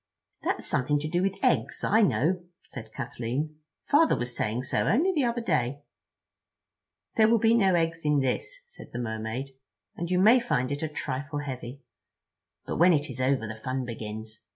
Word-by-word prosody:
"That's - - -1
something 145 +3 +1
to 150 +1 -3
do 175 +3 0
with 195 0 0
eggs, - - +1
I 220 +2 +4
know," 180 - +2 0.2
said 110 -4 -9
Kathleen. 125 +7 -4 0.3
"Father 320 +3 +4
was 120 0 -3
saying 115 +4 -1
so - - 0
only 335 - +3
the 295 -6 +2
other 235 0 -1
day." 145 - -1 1.3
"There 220 -1 +6
will 230 - +5
be 225 +1 +4
no 195 -6 +4
eggs 165 -1 0
in 150 -1 +3
this," 135 - -2
said 480 0 -13
the 120 - -3
Mermaid, 110 +3 -4 0.4
"and 170 0 -4
you 180 - +2
may 220 +7 +6
find 135 - -1
it 145 - -3
a 160 - 0
trifle 145 -1 -4
heavy. 130 -1 -7 0.8
But - - -3
when 175 +2 +6
it 150 -1 0
is 130 - -5
over 130 -3 +1
the 110 - -5
fun 130 0 -2
begins. 110 -1 -7
145 Hz, 180 wpm, -27 LUFS, 125-190 Hz, 1.3 s, There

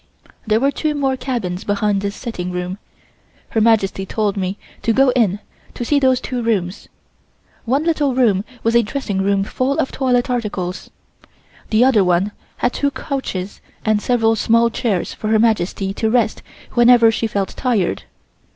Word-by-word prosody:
There 215 +1 +3
were 275 +3 +2
two 305 +1 -2
more 270 -2 0
cabins 235 -9 -3
behind 205 -1 0
this 200 0 -3
sitting 180 -7 -5
room. 180 +2 -4 0.7
Her 220 - 0
Majesty 210 -4 +2
told 205 +1 -1
me 190 0 -2 0.2
to 230 - +1
go 270 +2 +4
in 215 -6 +2 0.4
to 240 - -4
see 290 +3 +2
those 260 -2 +3
two 250 -1 -4
rooms. 205 -5 -2 0.8
One 270 +6 +1
little 300 -5 +1
room 215 -7 +3 0.2
was 230 +1 +1
a 235 - +6
dressing 210 -4 -3
room 195 0 +1
full 255 +7 -1
of - - 0
toilet 250 -2 +1
articles. 205 -7 -3 0.8
The 225 +3 +4
other 235 -7 +4
one 180 +3 +1 0.3
had 245 - 0
two 285 - 0
couches 265 -10 -5 0.2
and 215 -1 +2
several 225 -2 +2
small 230 +2 +3
chairs 210 -5 -1
for 215 - -5
Her 220 0 +3
Majesty 200 -3 +1
to 220 +2 -1
rest 225 -2 +1 0.3
whenever 240 -2 +6
she 225 +1 -1
felt 200 -3 -2
tired. 215 - -1
225 Hz, 165 wpm, -19 LUFS, 200-250 Hz, 0.8 s, a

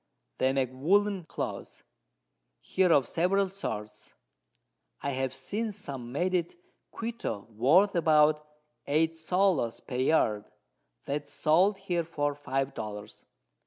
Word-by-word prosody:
They 130 - +3
make 135 -2 0
Woollen 190 +6 +2
Cloth - - -6 0.8
here 185 -2 +1
of 140 -6 +4
several 190 +3 +1
sorts; 110 - -7 0.8
I 140 - -2
have 130 -1 -1
seen 205 +12 -3
some 135 - -7
made 175 +7 0
at 175 -2 0 0.4
Quito 225 - -4
worth 150 - +4
about 155 -2 +4 0.4
8_s._ 160 -2 +1
per 125 - -6
Yard, 120 -6 +2 0.6
that 145 +1 -2
is - - -18
sold 175 +8 +3
here 180 -3 -1
for 145 -3 -1
5 135 -1 -2
Dollars. 105 -2 -7
150 Hz, 120 wpm, -29 LUFS, 130-185 Hz, 0.8 s, of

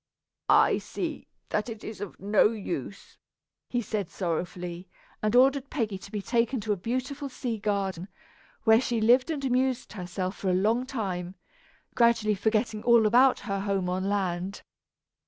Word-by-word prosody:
"I - - +5
see - - -5 0.2
that 210 +3 -1
it 225 -2 -8
is 215 - -7
of 205 - -7
no 205 +2 +4
use," 200 - -6 0.5
he 245 -1 -1
said 210 -5 -3
sorrowfully, 175 0 -4 0.3
and 215 +2 +1
ordered 270 +2 +4
Peggy 220 -8 -2
to 200 - -12
be 210 -2 -4
taken 235 +3 +1
to 210 - -2
a - - -1
beautiful 255 +8 -3
sea 240 -4 -4
garden, 195 -4 -2 0.6
where 220 +1 +6
she 240 -3 -1
lived 245 +6 +4
and 290 -4 -2
amused 255 -2 0
herself 185 0 -4
for 190 - -2
a 180 - +3
long 225 +7 +1
time, 190 -8 -4 0.6
gradually 230 -3 +3
forgetting 215 +2 0
all 235 -1 +5
about 250 +5 +5
her 200 -3 -3
home 195 -2 -1
on 185 +2 -1
land. 190 -1 -2
215 Hz, 155 wpm, -27 LUFS, 190-240 Hz, 0.6 s, where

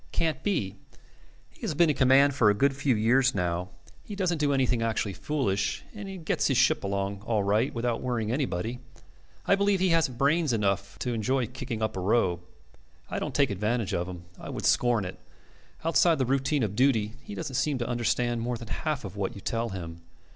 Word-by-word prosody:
Can't 155 -5 0
be. 100 - -1 0.7
He - - -24
has 155 - -2
been 165 0 +4
in - - -3
command 135 +2 +5
for 120 -5 +4
a 105 - +3
good 135 +5 +2
few 135 -2 +1
years 125 +4 +3
now. 90 +1 -1 0.3
He 205 - -7
doesn't 180 -5 0
do 145 -1 +2
anything 130 -3 +1
actually 110 -3 -1
foolish, 115 -7 -1
and 195 -5 -8
gets - - +1
his 135 - +1
ship 130 - +3
along 100 0 -2
all 110 -2 0
right 105 +6 +2
without 115 0 -2
worrying 120 -4 -1
anybody. 125 -3 -2 0.7
I - - +4
believe 200 0 +2
he 185 0 +2
hasn't 160 -7 +2
brains 145 +1 +2
enough 100 -2 -1
to 125 - -1
enjoy 120 +3 0
kicking 115 -1 -5
up 110 0 -1
a - - -3
row. 95 -3 +2 0.7
I - - -1
don't - - -4
take 140 -5 +3
advantage 105 +1 -1
of 85 0 -1
him. 90 -1 -8 0.2
I - - -8
would - - -4
scorn 120 -5 +3
it. 90 - -7 0.7
Outside 165 0 +4
the 130 - +1
routine 135 +2 +1
of 105 -2 -2
duty 115 -4 +2
he 210 - -8
doesn't 155 -5 -5
seem 135 +2 +1
to 120 -1 -3
understand 120 0 0
more 120 +1 -2
than 115 -1 -10
half 150 -3 -2
of - - -7
what 100 -2 -3
you 100 - -9
tell 115 +3 -2
him. 85 -4 -7
120 Hz, 205 wpm, -28 LUFS, 105-140 Hz, 0.7 s, command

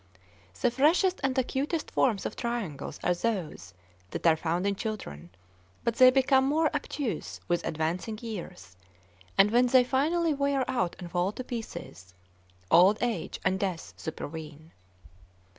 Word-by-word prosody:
The - - +2
freshest 335 +8 +3
and 265 -1 0
acutest 280 +5 -1
forms 220 -7 +1
of - - -3
triangles 230 - -4
are 180 - +3
those 175 - -3 0.3
that - - -6
are 165 -1 +6
found 170 +3 -1
in 200 0 +1
children, 190 - -6 0.5
but 235 -1 -1
they 255 -1 +9
become 265 +1 +4
more 310 +2 +2
obtuse 290 -4 -3
with 175 0 0
advancing 170 +7 -2
years; 175 - -8 0.6
and 200 +2 +6
when 245 +2 +4
they 255 0 +6
finally 310 +6 +1
wear 280 -2 0
out 215 -10 -1
and 175 -2 -9
fall 180 +2 +1
to 255 - -6
pieces, 170 - -8 0.6
old 190 +5 +6
age 230 -9 -2
and 190 0 +2
death 185 -4 -3
supervene. 160 0 -7
215 Hz, 140 wpm, -28 LUFS, 170-265 Hz, 0.6 s, they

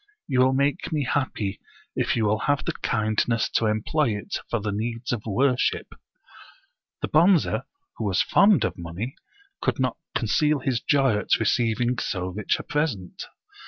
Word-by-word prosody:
You 130 -3 +1
will 130 +1 +5
make 140 +6 0
me 150 -2 0
happy, 125 -7 -2 0.4
if - - +1
you 110 - +1
will 105 +1 +1
have 145 0 +1
the - - 0
kindness 110 +1 0
to 115 - +1
employ 115 +7 +1
it 105 - -6
for 120 - 0
the 105 0 -3
needs 115 +3 -3
of 120 -4 -1
wor 125 +5 +2
ship." - - -1 1.1
The - - +1
Bonze, 170 +2 +5 0.5
who - - -4
was 95 -3 +2
fond 200 0 +4
of 90 +1 -4
money, 85 +10 -5 0.5
could - - 0
not 130 -2 0 0.2
conceal 150 +7 +2
his 125 -3 -1
joy 135 -8 +2
at - - +2
receiving 120 +2 +1
so 90 -2 -2
rich 100 +3 -1
a - - -7
present. 130 - -2
120 Hz, 165 wpm, -25 LUFS, 105-140 Hz, 1.1 s, will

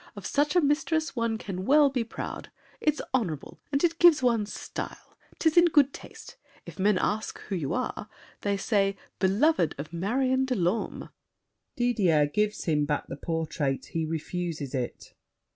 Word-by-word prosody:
Of - - -9
such 290 +3 +1
a 355 - +6
mistress 315 +2 0
one 230 -2 0
can 190 -4 -5
well 285 +4 +5
be 250 -3 0
proud! 230 - -7 0.3
It's 305 0 +1
honorable, 175 - -2
and 280 +2 +1
it 335 -1 +2
gives 335 -6 +6
one 230 -4 +2
style. - - -7 0.2
'Tis 320 0 +1
in 345 - +8
good 290 -5 +4
taste. - - -11 0.3
If - - -11
men 200 0 +3
ask 215 +3 -1
who 200 - -5
you 150 -6 -2
are 245 -4 -3 0.3
They 200 -1 0
say, 195 -1 +1 0.2
"Beloved 195 - +2
of 150 +4 -7
Marion 255 +9 +1
de 260 -1 -1
Lorme." 185 +2 -1 0.7
[Didier 200 - +3
gives 210 +8 -1
him 150 -3 +1
back 145 0 -2
the - - -4
portrait; 155 -3 -2
he 165 - 0
refuses 160 -2 -4
it. 125 -3 -4
210 Hz, 160 wpm, -27 LUFS, 165-270 Hz, 0.7 s, in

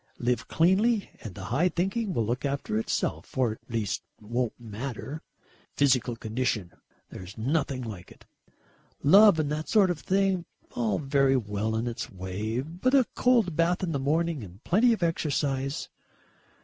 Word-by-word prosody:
Live 120 0 -1
cleanly 200 +6 +2
and 105 -5 -8
the 100 - -7
high 170 +8 +3
thinking 195 +5 -1
will 115 -10 0
look 120 +3 -2
after 140 -6 -1
itself 110 - -3
or 125 -4 +2
at 110 - -11
least 115 -4 -2 0.2
won't 120 +3 -2
matter. 120 +6 -6 0.5
Physical 130 -4 +2
condition, 110 -5 -2 0.4
there's 95 +3 -9
nothing 135 +2 -1
like 100 -6 -8
it. - - -17 0.8
Love 195 +5 +7
and 150 -2 0
that 155 +1 -3
sort 200 -4 +4
of 170 - -4
thing 190 -2 +1 0.3
all 110 -4 0
very 135 -2 +2
well 105 -1 -2
in 110 +2 -1
its 120 -1 -4
way, 100 +5 -3
but 175 - 0
a 265 -3 +5
cold 230 -9 +3
bath 170 +3 +1
in 175 - -1
the 140 - -1
morning 155 0 0
and 95 +3 -12
plenty 225 +7 +4
of 220 -6 0
exercise.... 140 -4 -1
135 Hz, 160 wpm, -27 LUFS, 115-175 Hz, 0.8 s, Love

